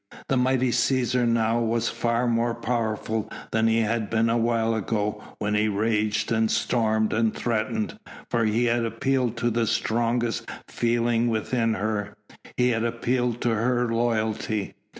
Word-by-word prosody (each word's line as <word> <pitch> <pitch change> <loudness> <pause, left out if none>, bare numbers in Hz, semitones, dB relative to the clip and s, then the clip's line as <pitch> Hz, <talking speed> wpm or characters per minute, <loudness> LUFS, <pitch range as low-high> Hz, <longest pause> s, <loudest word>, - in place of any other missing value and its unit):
The 135 - +2
mighty 130 0 +2
Cæsar 125 0 +1
now 115 0 +2
was 115 0 0
far 115 +1 0
more 115 0 +1
powerful 110 -2 -2 0.2
than 110 0 +2
he 115 0 +3
had 110 -1 -1
been 115 0 +2
a 120 - +2
while 115 -1 +1
ago 105 -1 -2
when 105 0 -1
he 105 +1 +2
raged 105 +1 0
and 110 -1 +2
stormed 110 -2 +1
and 110 -1 +1
threatened, 110 -2 -2 0.3
for 115 - 0
he 110 +2 +2
had 120 0 +1
appealed 120 +1 0
to 120 +1 0
the 115 0 0
strongest 115 +1 0 0.2
feeling 120 0 +1
within 115 0 0
her 105 0 -2 0.4
he 125 0 +3
had 115 -2 0
appealed 120 +1 -1
to 120 - +1
her 120 +1 +1
loyalty. 110 -3 -1
115 Hz, 150 wpm, -25 LUFS, 110-120 Hz, 0.4 s, he